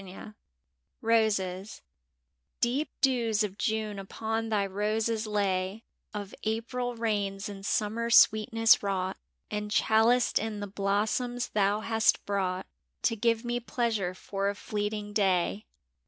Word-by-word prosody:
IRoses 210 -4 +1 0.8
EEP 260 +6 +1
dews 235 -5 +2
of 200 -2 -3
June 215 -2 -2
upon 225 +3 -3
thy 205 -2 +1
roses 215 +3 -1
lay, 200 0 -1 0.3
Of 205 -2 -6
April 240 +3 -2
rains 205 -4 -1
and 200 -1 -8
Summer 220 +3 0
sweetness 225 0 +5
wrought, 190 -2 -2 0.3
And 210 0 -3
chaliced 225 +3 +3
in 220 -2 -3
the 205 - -3
blossoms 210 +5 -1
thou 205 0 +1
hast 225 0 +2
brought 190 -2 -1 0.4
To 230 - +2
give 230 +1 +1
me 240 0 -1
pleasure 225 -6 -1
for 195 +1 -2
a 200 - -3
fleeting 210 0 -3
day. 195 0 +1
215 Hz, 120 wpm, -29 LUFS, 200-225 Hz, 0.8 s, sweetness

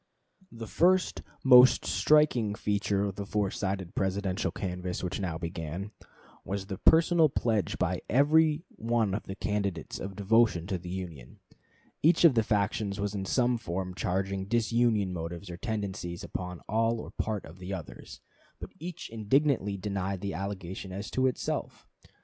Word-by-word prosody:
The 115 -1 -7
first, 180 - +2 0.2
most 125 -1 +7
striking 125 -9 +3
feature 100 -1 0
of 100 -2 -3
the 100 - -4
four 100 -2 0
sided 95 -2 -3
Presidential 95 +1 -1
canvass 90 -1 -4
which 90 +2 -3
now 90 -5 -2
began, 85 +3 -5 0.5
was 95 0 -4
the 95 0 -6
personal 165 +2 +5
pledge 110 -6 0
by - - -1
every 155 +4 +4
one 115 -3 0
of 105 - -3
the 95 - -5
candidates 100 -5 -2
of 95 0 -6
devotion 105 -3 +3
to 95 -1 -3
the 90 +1 -9
Union. 85 -9 -7 0.6
Each 165 +3 +4
of 160 - +8
the 115 - +3
factions 105 -1 -1
was 100 0 -2
in 95 -2 -3
some 120 +3 +1
form 90 -2 -4
charging 95 +2 -2
disunion 115 -3 +1
motives 85 +2 -6
or 85 - -7
tendencies 95 -5 -4
upon 90 -1 -5
part - - -25
or 105 - -4
all 115 0 0 0.3
of 80 +5 -13
the 90 +1 -7
others; 80 -11 -8 0.4
but - - -8
each 175 +1 -6
indignantly 115 -2 +1
denied 95 -1 -3
the 100 -1 -3
allegation 95 -1 -5
as 100 +3 -6
to 130 0 +2
itself. 130 - -3
100 Hz, 155 wpm, -29 LUFS, 95-115 Hz, 0.6 s, of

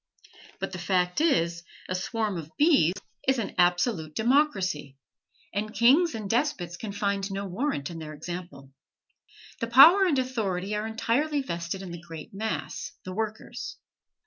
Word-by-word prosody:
But - - -3
the 185 - -6
fact 180 +5 +1
is, 170 - +2 0.3
a - - -2
swarm 210 +2 -2
of 155 -1 -8
bees 280 - +4 0.3
is 265 0 +4
an 225 - -3
absolute 175 -2 +2
democracy, 195 - +1 0.6
and 210 +2 -2
kings 275 +6 +5
and 215 -2 -5
despots 210 - 0
can 210 +2 -6
find 200 -1 -1
no 195 +1 -3
warrant 190 - -2
in 165 - -7
their 155 -1 -7
example. 155 -4 -8 0.9
The 230 - -2
power 320 +11 +8
and 320 -7 +2
authority 210 -7 -1
are 210 +1 -2
entirely 275 +7 0
vested 170 -3 -4
in 180 - -7
the 170 -1 -7
great 165 -1 -10
mass, 220 +2 -4
the 185 - -5
workers. 220 +1 -5
200 Hz, 150 wpm, -27 LUFS, 175-235 Hz, 0.9 s, power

